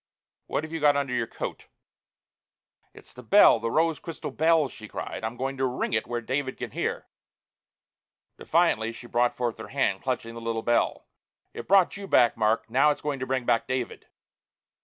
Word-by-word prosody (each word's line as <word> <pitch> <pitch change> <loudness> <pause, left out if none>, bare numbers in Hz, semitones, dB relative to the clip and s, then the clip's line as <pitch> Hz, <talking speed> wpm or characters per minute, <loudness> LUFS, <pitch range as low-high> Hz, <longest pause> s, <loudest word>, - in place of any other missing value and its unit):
What - - -2
have 155 +1 -8
you 165 - -2
got 145 -1 +4
under 140 -3 -1
your 120 -2 0
coat?" - - -6 1.2
"It's - - -15
the 125 - -11
bell, 125 - +6
the 115 - -2
rose 160 +2 +1
crystal 165 - -7
bell!" 160 -1 +3
she 110 -4 -11
cried. - - -6
"I'm 110 +2 -4
going 135 +2 -3
to 135 - +1
ring 125 -2 -3
it 110 - 0
where 120 0 -3
David 130 +3 -3
can - - -6
hear!" - - -3 1.3
Defiantly 155 -10 +1
she 115 - -11
brought 120 0 +1
forth 120 -3 -2
her 110 - -7
hand, 100 -8 0
clutching 125 -3 -3
the 115 - -8
little 115 -1 -3
bell. 120 - +1 0.5
"It - - -8
brought 195 -1 +4
you 200 -1 -7
back, 120 -9 +4
Mark! 110 0 +1
Now 135 +6 +4
it's 150 - -2
going 145 -2 -2
to 130 - -4
bring 130 -2 -1
back 115 - +1
David!" 130 -2 -4
130 Hz, 190 wpm, -26 LUFS, 115-145 Hz, 1.3 s, bell